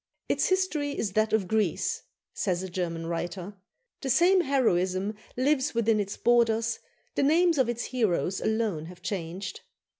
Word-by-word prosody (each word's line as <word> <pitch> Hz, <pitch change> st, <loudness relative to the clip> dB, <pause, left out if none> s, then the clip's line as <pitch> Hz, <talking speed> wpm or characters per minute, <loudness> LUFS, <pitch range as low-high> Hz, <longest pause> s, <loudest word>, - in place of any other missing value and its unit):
"Its -, -, +1 dB
history 320 Hz, -7 st, 0 dB
is 210 Hz, -, -1 dB
that 215 Hz, +1 st, +2 dB
of 220 Hz, -4 st, +1 dB
Greece," 215 Hz, -4 st, 0 dB, 0.3 s
says 185 Hz, -2 st, -1 dB
a 190 Hz, -, -5 dB
German 170 Hz, -2 st, -3 dB
writer; 175 Hz, +3 st, -4 dB, 0.5 s
"the 270 Hz, -, -3 dB
same 360 Hz, +7 st, +5 dB
heroism 200 Hz, -, +1 dB, 0.2 s
lives 265 Hz, 0 st, +1 dB
within 225 Hz, -2 st, +3 dB
its 200 Hz, 0 st, -3 dB
borders, 230 Hz, -1 st, +2 dB, 0.3 s
the -, -, 0 dB
names 325 Hz, +2 st, +4 dB
of 255 Hz, -3 st, +3 dB
its 240 Hz, 0 st, -2 dB
heroes 200 Hz, -6 st, 0 dB
alone 220 Hz, -8 st, -1 dB
have 180 Hz, 0 st, -13 dB
changed." 185 Hz, 0 st, -4 dB
220 Hz, 150 wpm, -28 LUFS, 185-260 Hz, 0.5 s, same